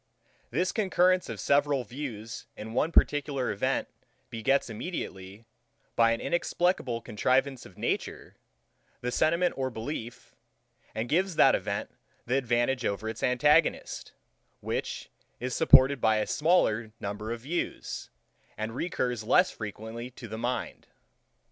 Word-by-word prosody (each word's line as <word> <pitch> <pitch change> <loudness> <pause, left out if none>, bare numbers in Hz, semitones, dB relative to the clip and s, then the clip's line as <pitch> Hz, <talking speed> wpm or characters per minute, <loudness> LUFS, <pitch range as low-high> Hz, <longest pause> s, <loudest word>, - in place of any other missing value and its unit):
This 185 +1 0
concurrence 185 -3 +2
of - - -5
several 140 -2 +2
views 115 -3 -7
in 110 +1 -7
one 150 +6 +1
particular 145 -5 +2
event 100 - 0 0.4
begets 125 +5 +1
immediately, 105 - -6 0.5
by 115 -1 +5
an 115 - 0
inexplicable 175 -8 0
contrivance 130 +4 0
of - - -19
nature, - - -3 0.7
the 125 - -2
sentiment 170 +6 +2
of 130 -2 -2
belief, 115 0 -6 0.6
and 110 +2 -2
gives 180 +5 +1
that - - +6
event - - -2 0.3
the 125 - 0
advantage 125 0 +1
over 100 +1 -2
its 110 0 -5
antagonist, 150 +6 +2 0.5
which - - -4 0.3
is 125 +1 -3
supported 140 -4 +6
by 110 -1 +4
a 105 - +1
smaller 120 -9 +2
number 105 +2 -4
of 115 0 -4
views, 165 +7 -4 0.5
and 110 +1 -3
recurs 125 -8 -2
less 180 +11 +4
frequently 110 +3 -6
to 125 -1 -10
the 110 +1 -6
mind. 125 +2 -3
125 Hz, 130 wpm, -29 LUFS, 110-145 Hz, 0.7 s, that